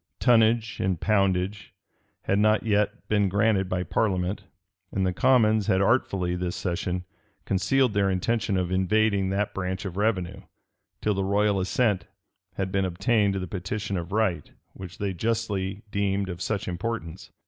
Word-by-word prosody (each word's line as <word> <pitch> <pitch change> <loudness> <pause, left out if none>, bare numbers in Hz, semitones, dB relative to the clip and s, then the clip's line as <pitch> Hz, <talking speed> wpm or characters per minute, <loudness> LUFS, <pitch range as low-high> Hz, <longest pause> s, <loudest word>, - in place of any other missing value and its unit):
Tonnage 115 -1 +3
and 95 -3 0
poundage 100 0 0 0.5
had 95 - +1
not 110 +1 +3
yet 105 -2 0
been 105 -2 +2
granted 100 -1 +2
by 90 -1 -1
parliament; 95 +1 -1 0.5
and 95 -1 0
the 90 - 0
commons 110 -2 +3
had 95 -3 +3
artfully, 95 -4 +1
this 90 0 -3
session, 90 0 -3 0.4
concealed 105 +6 +2
their 100 -1 +2
intention 100 +2 0
of 90 -1 -1
invading 100 +1 +2
that 100 +1 -1
branch 95 0 -3
of 95 -1 -5
revenue, 95 -3 -1 0.6
till 105 - +2
the 95 0 -1
royal 100 +1 +2
assent 95 0 0 0.5
had 95 -1 -2
been 95 0 +1
obtained 100 +3 +1
to 95 - -2
the 90 - -3
petition 100 +3 -4
of 85 0 -4
right, 95 -8 0 0.2
which 95 0 -10
they 100 -2 -2
justly 100 -1 -2
deemed 100 -1 0
of 90 0 -6
such 105 +2 -2
importance. 90 -2 -4
100 Hz, 155 wpm, -26 LUFS, 95-105 Hz, 0.6 s, Tonnage